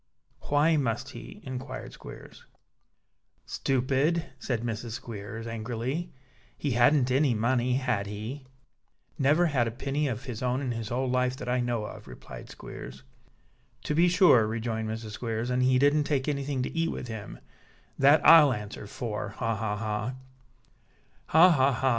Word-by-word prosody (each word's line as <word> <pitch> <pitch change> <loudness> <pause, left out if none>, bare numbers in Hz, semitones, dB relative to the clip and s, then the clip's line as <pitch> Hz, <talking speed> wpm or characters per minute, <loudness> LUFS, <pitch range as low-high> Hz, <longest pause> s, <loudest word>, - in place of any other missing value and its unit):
"Why 150 +3 +4
must 130 -1 -1
he?" 200 +8 -10
inquired 130 -1 -6
Squeers. - - -12 1.0
"Stupid!" 135 +6 0
said 120 -3 -2
Mrs. 115 -1 -4
Squeers, 115 -2 -7
angrily. 120 +9 -4 0.5
"He 145 - -2
hadn't 125 +2 +4
any 135 -2 +3
money, 125 +2 +1
had 125 -7 -1
he?" 115 +7 -6 0.7
"Never 150 +5 +4
had 135 -8 +1
a - - 0
penny 140 +5 -2
of 120 -1 -4
his 125 -5 -6
own 125 +1 0
in 130 -3 -2
his 115 -2 -4
whole 130 +2 -1
life, 125 0 +1
that - - -7
I 125 +1 +1
know 120 -3 -1
of," - - -10
replied - - -11
Squeers. 65 +1 -10 0.8
"To - - -2
be 170 +4 +4
sure," 175 - +5
rejoined 110 0 -3
Mrs. 110 0 -5
Squeers, 115 +2 -3
"and 125 0 +1
he 130 0 +4
didn't 145 +2 +3
take 140 -2 0
anything 140 -2 -1
to - - -5
eat 165 0 +1
with 125 - -5
him; 110 - -7 0.6
that 145 +2 +5
I'll 150 -5 +8
answer 105 -1 -7
for. 105 0 -4
Ha! 115 0 -1
ha! 105 0 -2
ha!" 110 +3 -3 1.1
"Ha! 165 +4 +7
ha! 135 -3 +4
ha!" 130 +3 +1
125 Hz, 160 wpm, -28 LUFS, 115-140 Hz, 1.1 s, I'll